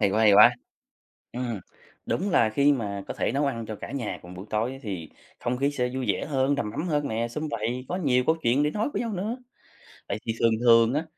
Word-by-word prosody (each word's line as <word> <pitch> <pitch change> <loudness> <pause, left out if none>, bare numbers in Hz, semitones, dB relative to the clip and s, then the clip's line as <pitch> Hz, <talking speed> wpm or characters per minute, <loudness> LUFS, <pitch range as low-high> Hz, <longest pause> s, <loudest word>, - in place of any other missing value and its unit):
Hay 100 -2 +3
quá, 105 +3 +1
hay 105 -2 +6
quá! 115 +4 +8 0.8
Ừm, 120 -4 -3 0.5
đúng 195 +4 -1
là 115 -10 +4
khi 140 +6 +4
mà 100 -7 -3
có - - -4
thể - - -1
nấu 140 +3 +1
ăn 115 -5 -3
cho 110 - -5
cả - - -8
nhà 130 -6 -3
cùng 90 +1 -11
buổi 95 +3 -9
tối 115 +5 -1
thì 95 -8 -5 0.3
không 120 +1 -1
khí 140 +2 +2
sẽ 125 -4 -1
vui 130 -1 -2
vẻ - - -4
hơn, 140 -1 +1
đầm 120 -7 -2
ấm 170 +11 -3
hơn 145 -3 0
nè, 115 +1 -1
sum 150 +6 -4
vầy, 120 +1 -3
có 180 - -2
nhiều 130 -8 +2
câu 160 - +3
chuyện 120 +5 +3
để 150 - +2
nói 215 - -1
với - - -1
nhau 230 -2 -2
nữa, 205 +5 -2 0.7
vậy 100 - -2
thì 115 - -1
thường 115 - +4
thường 115 0 +5
á 150 +3 0
125 Hz, 245 wpm, -26 LUFS, 110-145 Hz, 0.8 s, quá